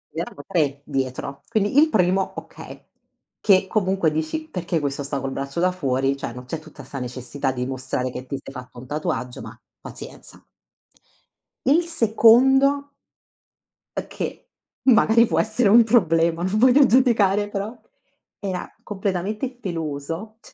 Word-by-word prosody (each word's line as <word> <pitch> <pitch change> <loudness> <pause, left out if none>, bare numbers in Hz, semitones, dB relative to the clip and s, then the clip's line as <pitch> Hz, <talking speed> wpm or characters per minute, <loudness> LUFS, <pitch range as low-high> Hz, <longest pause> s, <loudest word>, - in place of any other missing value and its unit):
Ed - - -3
erano 145 -4 -6
3 145 -7 0
dietro. 135 0 -3
Quindi 220 +3 +2
il 310 +1 +5
primo, 185 - +1
okay. - - -10 0.6
Che 190 -2 +4
comunque 190 -5 +1
dici: 160 - -3
"Perché 175 - -2
questo 140 -1 -3
sta 140 0 -3
col 135 0 -4
braccio 140 +3 -4
da 180 +1 +3
fuori? 135 -6 0
Cioè 135 -3 -6
non 125 +1 -9
c'è 160 +5 -5
tutta 155 -2 -13
sta 135 +2 -7
necessità 130 +2 -3
di 125 -1 -3
dimostrare 130 0 -3
che 130 +1 -8
ti 140 - -4
sei 135 - -11
fatto 125 0 -10
un 125 - -10
tatuaggio, 125 -4 -3
ma - - -10 0.2
pazienza". - - -10 1.2
Il 300 +6 +4
secondo 270 +2 +4 1.1
è - - -3
che, - - -6 0.4
magari 230 -1 +5
può - - +1
essere 220 0 +2
un 230 +2 +8
problema, 170 -7 +2
non 190 +3 0
voglio 255 +5 +6
giudicare 215 -6 +3
però, 205 +3 -5 0.6
era 190 -3 -4
completamente 205 +4 -3
peloso. 165 - -5
180 Hz, 145 wpm, -23 LUFS, 140-220 Hz, 1.2 s, un